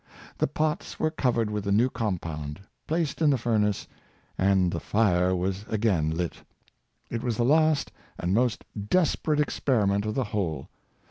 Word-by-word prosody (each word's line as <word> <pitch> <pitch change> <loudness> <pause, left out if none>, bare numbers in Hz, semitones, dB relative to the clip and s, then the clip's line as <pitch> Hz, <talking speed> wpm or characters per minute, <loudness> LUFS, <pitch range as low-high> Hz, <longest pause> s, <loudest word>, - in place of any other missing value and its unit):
The - - +2
pots 155 +2 -2
were 155 - +1
covered 120 -7 0
with 105 -1 -2
the 100 - -1
new 110 +5 +4
compound, 80 - -4 0.3
placed 160 -1 -1
in 155 - +5
the 140 - +3
furnace, 110 -4 0 0.5
and 95 -2 +3
the 85 - -2
fire 95 -4 +2
was 95 +2 -2
again 100 -8 +1
lit. 85 +1 -2 0.7
It'was 115 -1 -2
the 120 - +2
last 155 +1 +3 0.3
and 90 +2 -1
most 120 +1 +1 0.2
desperate 155 -3 +2
experiment 105 -8 +1
of 105 - -2
the 135 - +1
whole. 80 -9 -2
105 Hz, 150 wpm, -27 LUFS, 95-130 Hz, 0.7 s, in